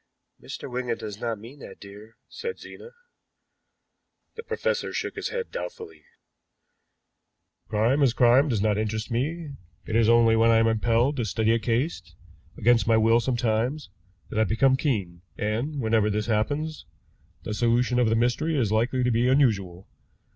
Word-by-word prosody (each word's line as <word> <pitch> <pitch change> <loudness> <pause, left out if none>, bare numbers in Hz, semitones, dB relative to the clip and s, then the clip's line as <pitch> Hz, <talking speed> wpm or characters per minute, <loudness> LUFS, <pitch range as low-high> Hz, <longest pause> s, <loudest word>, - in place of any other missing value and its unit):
"Mr. - - -8
Wigan 125 -2 -3
does 105 0 -8
not 115 -2 -2
mean 120 +7 -13
that, - - -11
dear," 105 +3 -13
said 465 -1 -6
Zena. 465 - -12 1.4
The 455 - -8
professor 480 +1 -2
shook - - -4
his - - -4
head 470 0 -5
doubtfully. 475 -4 -8 1.6
"Crime 115 +6 +1
as 130 -4 +3
crime 125 +5 +4
does 110 -5 0
not 105 -1 +1
interest 110 +2 -3
me. 150 +6 -2 0.3
It 110 - -4
is 115 -1 +4
only 115 -1 +5
when 115 +1 +4
I 115 - +5
am 115 - +3
impelled 115 +5 +1
to 120 - 0
study 110 +1 0
a 115 - +2
case, 115 - -2 0.4
against 120 +1 +3
my 115 -1 +4
will 115 +1 +4
sometimes, 120 +1 -1 0.4
that 110 - -2
I - - +5
become 130 +6 +2
keen; 100 - -2 0.2
and, 120 +8 -2
whenever 110 -3 +1
this 105 0 -1
happens, 145 - -2 0.6
the 105 - -4
solution 120 +2 +1
of 120 -3 +3
the 115 - +2
mystery 125 +7 0
is 115 -6 0
likely 120 +4 +1
to 125 - +1
be 120 +2 +2
unusual. 100 -9 +1
115 Hz, 160 wpm, -25 LUFS, 110-135 Hz, 1.6 s, only